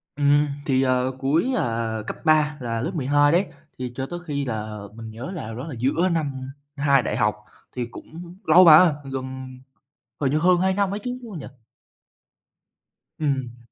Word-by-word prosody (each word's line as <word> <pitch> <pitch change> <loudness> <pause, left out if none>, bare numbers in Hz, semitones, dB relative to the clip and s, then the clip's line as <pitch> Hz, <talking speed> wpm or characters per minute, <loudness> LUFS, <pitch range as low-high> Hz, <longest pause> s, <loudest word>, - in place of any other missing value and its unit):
Ừm, 145 +1 +3 0.2
thì, 130 -2 +2
ờ, 130 0 +1
cuối, 160 - +1
ờ, 115 - -1
cấp - - -5
3 150 -1 +3
là 115 -2 -2
lớp 165 - -2
12 145 +1 +3
đấy, 180 +4 +3 0.3
thì 125 -1 -4
cho 130 - -3
tới 175 0 -5
khi 140 -1 -2
là 110 -3 -4
mình 110 -1 -9
nhớ 120 +10 -7
là 180 - -5
đâu 110 - -6
đó 130 +6 -6
là 140 - -6
giữa 160 +9 +1
năm 135 -5 -3 0.2
2 140 -2 +3
đại - - -2
học, 105 0 +2 0.4
thì 125 -1 -2
cũng 170 +8 -11
lâu 175 +4 +7
mà, 160 0 +8 0.2
gần 130 -1 -6 0.6
hình 135 -1 +1
như 150 - +2
hơn 180 +2 +4
2 190 +1 +2
năm 200 0 0
ấy 205 - -3
chứ, 250 0 -4
đúng 230 -3 -10
không 170 - -6
nhỉ? - - -8 1.7
Ừm. 135 -5 -2
140 Hz, 190 wpm, -23 LUFS, 125-165 Hz, 1.7 s, mà